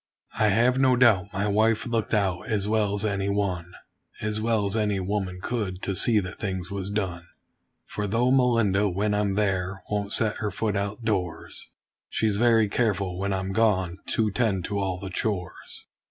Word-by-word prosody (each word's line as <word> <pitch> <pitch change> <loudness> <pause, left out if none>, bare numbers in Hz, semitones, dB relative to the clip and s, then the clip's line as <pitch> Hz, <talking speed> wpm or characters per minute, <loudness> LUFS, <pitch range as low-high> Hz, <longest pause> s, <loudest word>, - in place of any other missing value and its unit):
I 110 - +4
have 120 +5 +3
no 130 -1 +4
doubt 105 -6 +4
my 100 +1 -1
wife 110 +2 +2
looked 115 -3 -1
out, 95 -4 0
as 105 -2 0
well 105 -2 +1
as 105 +1 0
any 100 -1 -1
one 95 -4 -1 0.5
As 105 0 -1
well 110 -2 +1
as 100 +1 0
any 105 -3 +1
woman 95 -1 -2
could 100 -6 -3
to 100 - -1
see 110 +3 +4
that 90 0 -8
things 95 -3 -4
was 100 -1 -3
done: 90 -5 -3 0.6
For 105 0 -4
though 120 +5 +2
Melinda, 115 -6 +3
when 100 +3 0
I'm 105 -1 0
there, 95 -2 -1
won't 100 -1 -1
set 110 -1 +2
her 105 - -2
foot 105 +1 -2
outdoors, 100 -3 -3 0.4
She's 110 -2 0
very 115 -1 +4
careful, 100 -5 -1
when 100 +1 -1
I'm 95 0 -2
gone, 95 -4 +1
to 110 -2 +1
tend 100 -5 0
to 100 -1 -2
all 95 -2 -1
the 95 +1 -7
chores. 95 -2 -4
100 Hz, 180 wpm, -26 LUFS, 95-110 Hz, 0.6 s, I